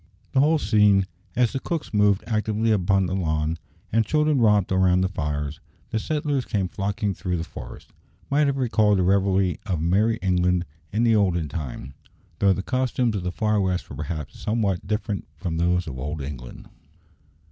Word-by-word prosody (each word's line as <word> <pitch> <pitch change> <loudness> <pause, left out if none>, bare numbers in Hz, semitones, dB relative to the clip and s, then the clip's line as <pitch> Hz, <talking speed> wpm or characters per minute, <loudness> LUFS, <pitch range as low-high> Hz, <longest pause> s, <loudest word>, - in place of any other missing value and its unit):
The 135 - +2
whole 155 +4 +4
scene, 105 -5 +4 0.3
as 120 -2 +2
the 135 - -1
cooks 165 -3 -4
moved 105 -1 +3
actively 110 0 0
about 105 -3 +2
upon 95 -1 +3
the 90 - -3
lawn, 80 -3 -1 0.3
and 115 +1 +3
children 150 +1 +2
romped 105 -4 +3
round 95 -1 +3
the - - +2
fires, 75 -4 -3 0.3
and 110 - 0
settlers 150 -2 -1
came 100 -5 -1
flocking 100 +2 -2
through 90 0 -2
the 80 - -3
forests, - - -10 0.4
might 145 +1 +2
have 140 -1 0
recalled 110 -5 +3
the 95 - +2
revelry 95 -1 +2
of 90 -5 -1
merry 100 +8 +2
England 90 -1 +2 0.3
in 110 +3 +1
the 115 -1 +4
olden 85 -7 +1
time, 70 -3 -6 0.5
though 100 -1 +4
the 95 0 -1
costumes 125 -2 0
of - - -3
the 90 0 -2
far 105 +1 +1
west 95 -1 -2
were - - -6
perhaps 75 +1 -5
somewhat 105 -5 -1
different 105 -1 -2
from 85 -5 -3
those 90 +1 +1
of 65 -6 -6
old 75 +2 -4
England. 65 -3 -8
100 Hz, 180 wpm, -24 LUFS, 90-110 Hz, 0.5 s, whole